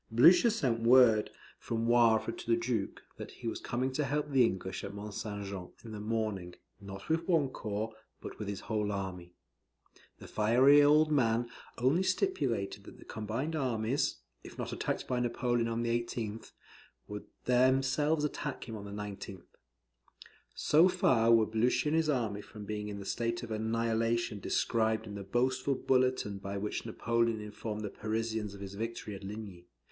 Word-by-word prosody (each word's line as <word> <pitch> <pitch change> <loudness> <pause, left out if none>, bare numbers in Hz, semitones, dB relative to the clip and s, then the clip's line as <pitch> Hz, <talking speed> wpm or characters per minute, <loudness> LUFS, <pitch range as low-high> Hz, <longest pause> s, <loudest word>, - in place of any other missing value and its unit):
Blucher 170 - +7
sent 130 - 0
word 115 -2 +6 0.3
from 115 0 -2
Wavre 115 -2 +4
to - - -10
the 115 - +4
Duke, 115 -4 -2
that - - -7
he - - -8
was - - -2
coming 130 +2 -1
to 150 +3 -1
help 150 +1 -1
the 135 -2 +5
English 95 -4 -2
at 100 +1 -6
Mont 105 0 -7
St. 105 -1 -5
Jean, 95 -2 -6
in 115 - -9
the 105 - -6
morning, 105 -5 -2 0.2
not 100 -1 -9
with 165 +1 0
one 160 -7 +3
corps, 110 -2 -4 0.3
but - - -9
with 105 - -4
his 100 -1 -4
whole 105 -1 -1
army. 90 -3 -5 0.8
The - - -12
fiery 125 +7 +5
old 150 +2 +5
man 120 -4 +2 0.3
only 135 +9 +3
stipulated 185 - -1
that - - -12
the - - -15
combined 115 +9 -3
armies, 125 -2 0 0.3
if - - -11
not - - -4
attacked - - -2
by 125 - 0
Napoleon 120 -1 0
on 115 0 -1
the 115 - 0
18th, 115 -2 -5 0.6
should 105 0 -7 0.2
themselves 130 +4 +3
attack 145 -2 -4
him 115 - -6
on 100 -1 -7
the - - -7
19th. 100 -3 -8 1.1
So 165 +5 +5
far 120 -11 +3
were 115 -1 +6
Blucher 125 +6 +1
and 155 - +1
his 160 -1 +2
army 115 -7 0
from 105 0 -10
being 105 0 -4
in 100 - -5
the 100 - -7
state 115 +3 -2
of 115 - -7
annihilation 115 0 0
described 110 +2 0
in 105 - -8
the 100 - -6
boastful 130 +6 0
bulletin 130 -7 +1
by 100 0 -5
which 105 +3 -3
Napoleon 115 0 0
informed 105 0 -5
the 105 - -4
Parisians 110 -1 -3
of 100 - -11
his 100 0 -7
victory 110 0 -5
at 95 - -9
Ligny. 100 -4 -8
115 Hz, 175 wpm, -32 LUFS, 105-130 Hz, 1.1 s, Blucher